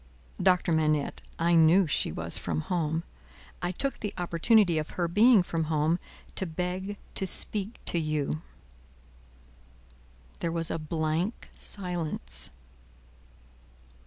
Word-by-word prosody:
"Doctor 180 -2 +3
Manette, 155 -2 +1 0.2
I 170 +1 +2
knew 165 +3 +6
she 145 - 0
was 85 +1 -1
from 80 -3 -2
home. 165 - -1 0.6
I 175 - -1
took 275 +9 -2
the 210 - -4
opportunity 175 +1 +3
of 155 - -4
her 175 -1 +1
being 210 +3 +5
from 165 -2 -2
home, 155 +2 +1 0.3
to 190 - +1
beg 180 +4 -3 0.2
to 190 - +1
speak 205 +4 +2
to 170 - +2
you." 155 -1 -1 2.0
There 170 - -1
was 165 -1 -1
a - - -2
blank 160 +6 -2
silence. 170 - -3
170 Hz, 120 wpm, -28 LUFS, 155-185 Hz, 2.0 s, knew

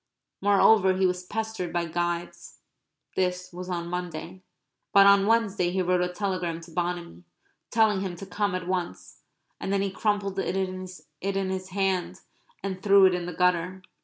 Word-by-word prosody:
Moreover 200 -1 +5
he 190 - +3
was 180 0 0
pestered 220 -2 -4
by 175 0 0
guides. 175 +1 -3 0.6
This 180 -1 -1
was 180 +1 -7
on 170 -1 -2
Monday. 180 0 -5 0.5
But 200 0 +8
on 200 0 +6
Wednesday 210 -5 +2
he 185 +1 0
wrote 180 0 +2
a 180 - +1
telegram 180 -3 -2
to 165 0 -13
Bonamy, 175 - -3 0.5
telling 220 -4 +3
him 190 -2 -3
to 185 - -8
come 200 -1 -1
at 180 -1 -4
once. 180 -2 -4 0.4
And - - -3
then 200 0 +1
he 195 - -2
crumpled 200 -1 -1
it 190 - -1
in 190 +1 -4
his 185 0 -4
hand 185 -2 -1 0.4
and 190 -1 -4
threw 200 -1 +6
it 185 - +5
in 175 -1 -2
the 180 - -5
gutter. 180 +1 +1
185 Hz, 165 wpm, -27 LUFS, 175-195 Hz, 0.6 s, But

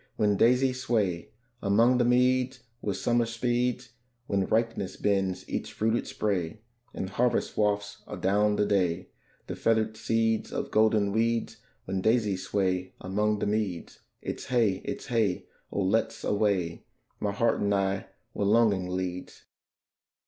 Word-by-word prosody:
when 105 -1 +2
daisies 125 +4 +3
sway 105 -9 0 0.3
Among 115 +5 +4
the - - +4
meads 125 +1 +2 0.2
where 100 -4 -2
Summer 120 -1 +1
speeds; 120 +1 -1 0.3
When 100 -3 0
ripeness 115 -4 -1
bends 95 -2 0
each - - -4
fruited 110 +2 0
spray, 100 -1 -2 0.3
And 95 - -4
harvest 120 +4 0
wafts 105 -1 0
adown 105 +2 +1
the 105 - +2
day 90 -3 0 0.4
The - - -5
feathered 110 -1 +1
seeds 115 0 0
of - - -3
golden 110 -2 +3
weeds: 115 +2 0 0.3
When 95 0 -2
daisies 105 -4 +1
sway 95 -2 -1
among 105 +3 0
the - - -2
meads, 105 -5 -2 0.2
It's - - -5
hey, 115 -7 +1
it's - - -4
hey! 110 -8 0 0.3
oh, 100 - -1
let's 105 +4 0
away, 100 -5 0 0.4
My - - -1
heart - - +1
and 100 - +1
I, 95 -1 0 0.3
where 100 - -1
longing 105 -4 +3
leads. 90 0 -4
105 Hz, 140 wpm, -28 LUFS, 95-115 Hz, 0.4 s, Among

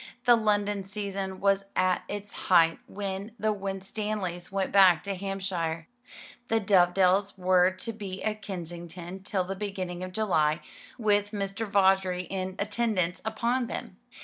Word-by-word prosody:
The 240 -1 +8
London 205 -2 +1
season 195 -1 -4
was 195 0 +2
at 185 -1 +2
its 205 0 -6
height 165 -3 +3
when 200 +1 -5
the 215 0 +1
Winstanleys 195 -2 -4
went 195 -1 -1
back 185 -5 +6
to 200 - -2
Hampshire. 185 -4 -3 0.6
The 225 - +2
Dovedales 190 0 +3
were 180 -1 +4
to 190 +5 -5
be 195 -3 -6
at 215 0 -2
Kensington 175 -1 -7
till 195 -1 -1
the 190 +2 -4
beginning 185 -3 -4
of 185 - -5
July, 170 -7 +1 0.4
with 205 -2 +2
Mr. 200 +2 -3
Vawdrey 190 -2 +3
in 185 0 -4
attendance 200 -4 0
upon 235 +3 0
them. - - -6
195 Hz, 140 wpm, -28 LUFS, 185-205 Hz, 0.6 s, The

